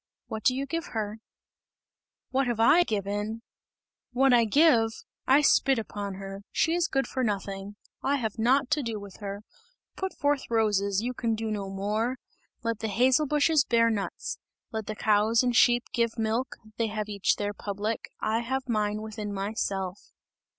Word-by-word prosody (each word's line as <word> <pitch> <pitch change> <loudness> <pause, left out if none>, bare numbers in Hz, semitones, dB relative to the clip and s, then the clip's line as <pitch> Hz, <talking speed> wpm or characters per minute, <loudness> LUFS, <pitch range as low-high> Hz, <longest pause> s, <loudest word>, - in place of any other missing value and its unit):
What 220 0 -6
do 255 - +4
you 275 +1 -2
give 330 +4 -3
her?" 215 0 -3 1.1
"What 270 0 +1
I 230 +8 +6
have 350 - +3
given? 210 +1 -2 0.7
What 265 +1 +4
I 235 -1 +5
give? 235 -2 +5 0.4
I 270 +3 +6
spit 270 -2 +4
upon 205 -3 -4
her! 195 0 -7
She 325 - +2
is 345 0 +2
good 270 0 0
for 260 - -2
nothing! 200 -2 -3 0.3
I 275 +1 +1
have 225 -5 -3
nought 255 +4 +3
to 305 -1 +2
do 230 -4 -3
with 200 -2 -11
her. 200 0 -6 0.5
Put 380 0 -4
forth 285 -1 0
roses, 205 -3 +1
you 250 +1 -2
can 230 -2 -1
do 220 0 -3
no 200 -2 -3
more! 210 +6 -1 0.5
Let 230 -2 -1
the 220 - -2
hazel 255 +8 +3
bushes 300 +1 +3
bear 230 -3 +3
nuts! 200 -3 -4 0.3
Let 220 -2 -4
the 215 - -3
cows 215 +3 +3
and 245 -1 +1
sheep 240 0 +5
give 235 -1 0
milk; 225 +3 -1 0.2
they 230 - +1
have 215 0 -3
each 200 -2 +1
their 205 0 -2
public, 205 +2 -4
I 220 +1 0
have 260 +3 -3
mine 215 -2 0
within 215 -1 -5
myself! 195 -2 -3
225 Hz, 170 wpm, -28 LUFS, 205-255 Hz, 1.1 s, I